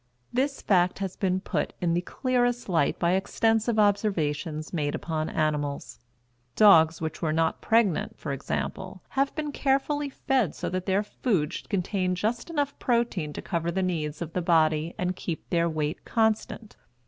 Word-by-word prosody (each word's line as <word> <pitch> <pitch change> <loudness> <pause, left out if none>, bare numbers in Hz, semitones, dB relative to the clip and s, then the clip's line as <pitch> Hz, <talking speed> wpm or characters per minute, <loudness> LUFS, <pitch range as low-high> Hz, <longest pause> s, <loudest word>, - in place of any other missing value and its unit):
This 270 +3 0
fact 180 -2 +3
has 195 -2 -4
been 190 -1 0
put - - -2
in 175 -2 +1
the 175 - +1
clearest 245 +3 0
light 165 -6 +1
by 170 0 +1
extensive 225 +4 +1
observations 165 -7 0
made 145 -3 -1
upon 155 -1 -3
animals. 150 -2 -2 0.6
Dogs 165 -6 +6
which 160 -1 -4
were 160 - +1
not 160 +1 0
pregnant, 225 -6 +2
for - - -5
example, - - -4
have 275 +1 0
been 300 -1 -3
carefully 285 +1 0
fed 260 - 0
so - - -3
that 185 +1 -3
their 195 +2 +2
food 200 - -1
should - - -7
contain 185 -1 0
just 225 - -2
enough 290 -4 -2
protein 235 -10 0
to - - -6
cover 170 -2 -2
the 190 +2 0
needs 160 -3 -2
of 165 - -9
the 180 - 0
body 160 -1 +2
and 180 0 -1
keep 170 -3 -5
their 170 -1 +2
weight 155 -1 -2
constant. 220 -1 -1
185 Hz, 165 wpm, -27 LUFS, 160-225 Hz, 0.6 s, Dogs